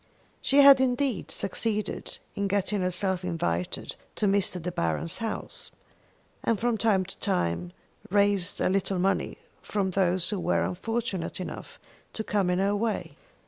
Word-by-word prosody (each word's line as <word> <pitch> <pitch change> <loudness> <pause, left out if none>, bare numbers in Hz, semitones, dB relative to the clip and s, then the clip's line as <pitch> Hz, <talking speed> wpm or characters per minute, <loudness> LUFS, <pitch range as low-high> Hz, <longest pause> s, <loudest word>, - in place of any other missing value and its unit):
She 280 +1 +5
had 275 -1 +9
indeed 255 -4 0
succeeded 215 +2 -2 0.2
in 200 0 -1
getting 200 0 0
herself 185 0 0
invited 90 - -2 0.2
to - - 0
Mr. 195 -2 +2
De 180 +2 -4
Baron's 85 - -1
house, 225 -1 -5 0.7
and 225 -3 +1
from 240 0 +1
time 205 -4 +2
to 195 - -10
time 85 - -1 0.4
raised 200 -1 +2
a - - +2
little 195 0 0
money 190 +2 0 0.2
from 195 -2 -1
those 185 -1 +2
who 205 - -1
were 175 - +1
unfortunate 210 -1 -2
enough 185 - -7 0.4
to 220 - -3
come 200 -4 +1
in 180 - +2
her 200 +2 +2
way. 220 +1 -2
195 Hz, 145 wpm, -27 LUFS, 180-215 Hz, 0.7 s, had